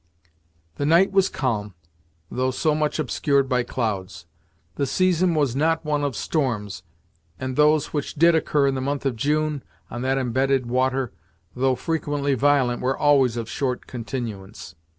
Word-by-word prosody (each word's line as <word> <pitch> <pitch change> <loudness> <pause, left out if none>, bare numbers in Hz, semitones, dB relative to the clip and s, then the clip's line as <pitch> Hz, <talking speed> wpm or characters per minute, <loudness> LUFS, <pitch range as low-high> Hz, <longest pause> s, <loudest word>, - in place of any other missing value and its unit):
The 145 - -1
night 170 +5 +4
was 195 -1 +3
calm, 105 - -2 0.6
though 130 +1 0
so 140 +4 0
much 150 -1 0
obscured 140 -1 +1
by 125 -1 +1
clouds. 105 -8 -3 0.5
The 140 - -1
season 180 +1 +2
was 140 -5 +1
not 160 +3 +1
one 150 -1 0
of 140 -4 -1
storms, 115 - -2 0.6
and 130 0 -4
those 150 0 +3
which 145 -2 -3
did 170 +3 +5
occur 150 -3 +2
in 135 - +2
the 130 - -3
month 140 +1 -2
of 135 -3 0
June, 150 +3 0 0.3
on 120 - -5
that 130 +1 0
embedded 130 +1 +1
water, 130 0 0 0.4
though 130 +1 +2
frequently 145 -2 -1
violent 130 -2 +2
were 130 +1 0
always 135 -5 +3
of 115 -1 -4
short 125 0 -2
continuance. 115 -6 -6
135 Hz, 155 wpm, -23 LUFS, 125-150 Hz, 0.6 s, did